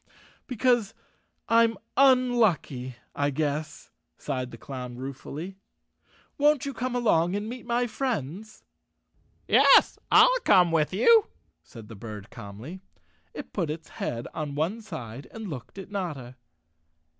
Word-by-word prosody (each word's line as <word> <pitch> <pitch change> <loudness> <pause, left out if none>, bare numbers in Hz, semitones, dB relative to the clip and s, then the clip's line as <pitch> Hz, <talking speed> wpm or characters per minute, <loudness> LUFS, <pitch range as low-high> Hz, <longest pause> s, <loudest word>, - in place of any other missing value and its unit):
"Because 240 -4 +1 0.5
I'm 230 -1 +4 0.2
unlucky, 235 - +3 0.2
I 145 0 0
guess," 150 +1 -3 0.3
sighed 130 -3 -4
the 115 - -11
clown 125 -1 -7
ruefully. 140 +7 -7 0.8
"Won't 295 0 +3
you 275 - -4
come 255 0 -3
along 185 -7 +2
and 205 +1 -3
meet 245 +1 -8
my 240 +1 +1
friends?" 220 - -4 0.8
"Yes, - - +6
IT1 - - +6
come 180 -3 +5
with 155 -2 +2
you," 440 - +5 0.3
said 115 -3 -13
the 115 - -10
bird 105 0 -9
calmly. 115 - -9 0.5
It - - -8
put 175 -6 -1
its 155 +1 -6
head 120 0 -3
on 150 -2 -4
one 175 +10 -1
side 135 - -8
and 220 -1 -8
looked 145 +1 -8
at 195 +1 -9
Notta. 150 -11 -5
175 Hz, 130 wpm, -27 LUFS, -, 0.8 s, Yes